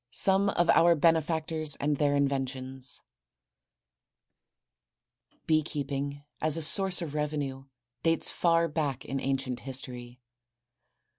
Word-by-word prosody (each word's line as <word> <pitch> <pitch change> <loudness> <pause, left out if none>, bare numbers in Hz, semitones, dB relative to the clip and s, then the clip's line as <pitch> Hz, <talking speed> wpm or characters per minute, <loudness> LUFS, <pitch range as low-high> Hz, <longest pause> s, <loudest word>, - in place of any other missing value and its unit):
SOME 195 +6 +3
OF 175 -3 +1
OUR 170 0 +5
BENEFACTORS 160 -1 +1
AND 145 0 -1
THEIR 145 0 +2
INVENTIONS. 135 -1 -3 2.4
Bee 155 -1 +3
keeping 145 -1 -4 0.2
as 155 0 +2
a 165 - -1
source 190 +2 +4
of 150 -4 -6
revenue 145 -3 -3 0.4
dates 165 0 +1
far 170 -1 +2
back 145 -4 -3
in 135 - -3
ancient 135 -2 -2
history. 125 -2 -6
145 Hz, 105 wpm, -28 LUFS, 135-165 Hz, 2.4 s, OUR